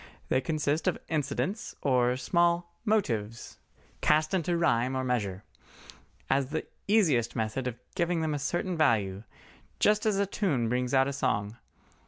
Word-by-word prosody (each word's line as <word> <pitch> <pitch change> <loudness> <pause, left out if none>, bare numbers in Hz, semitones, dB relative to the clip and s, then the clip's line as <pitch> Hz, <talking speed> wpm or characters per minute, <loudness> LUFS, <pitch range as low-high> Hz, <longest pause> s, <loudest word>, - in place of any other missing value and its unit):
They 130 - +2
consist 155 0 -1
of - - +2
incidents 165 - -2
or 125 -2 +2
small 170 +4 +1
"motives" 115 - -1 0.4
cast 155 +2 +2
into 175 -1 +1
rhyme 130 -5 +1
or 130 - -1
measure, 105 -7 -2 0.8
as 135 0 +1
the 155 +1 -3 0.2
easiest 165 - +3
method 110 +4 -2
of 120 -2 -4 0.2
giving 170 -2 0
them 160 -1 0
a 145 - -2
certain 175 +5 -1
value, 105 - +2 0.6
just 210 +1 +3
as 210 -2 +2
a 200 - +2
tune 150 - 0
brings 125 +2 0
out 135 0 +4
a 140 - -2
song. 115 -6 -1
140 Hz, 150 wpm, -29 LUFS, 120-170 Hz, 0.8 s, out